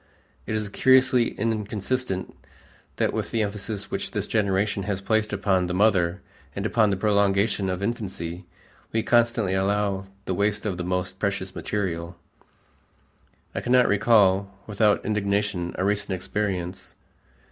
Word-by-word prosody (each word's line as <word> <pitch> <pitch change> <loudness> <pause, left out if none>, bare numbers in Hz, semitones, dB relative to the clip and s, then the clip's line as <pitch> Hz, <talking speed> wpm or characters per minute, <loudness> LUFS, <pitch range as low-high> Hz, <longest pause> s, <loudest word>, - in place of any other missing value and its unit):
It 110 - -1
is 105 -1 -1
curiously 130 +1 +4
inconsistent 105 -1 -2 0.6
that - - 0
with - - -2
the 115 -1 0
emphasis 105 0 -4
which - - -2
this - - -2
generation 100 -1 0
has 100 -2 -1
placed 110 +2 0
upon 95 -3 +1
the 90 - -2
mother 95 -3 +2 0.3
and 100 - -3
upon 110 -1 +3
the 100 - 0
prolongation 100 -1 +2
of 90 +1 -3
infancy, 95 -6 -4 0.4
we 110 0 0
constantly 115 -5 +2
allow 95 0 0 0.2
the 95 - -1
waste 105 +3 0
of 95 -4 -2
this 90 - -3
most 90 0 -2
precious 100 -2 -2
material. 85 -4 -3 1.4
I - - -3
cannot 125 0 +4
recall 100 -2 +4
without 105 0 +2
indignation 100 -3 -1
a 95 - 0
recent 105 0 0
experience. 95 -1 -3
100 Hz, 135 wpm, -25 LUFS, 95-110 Hz, 1.4 s, curiously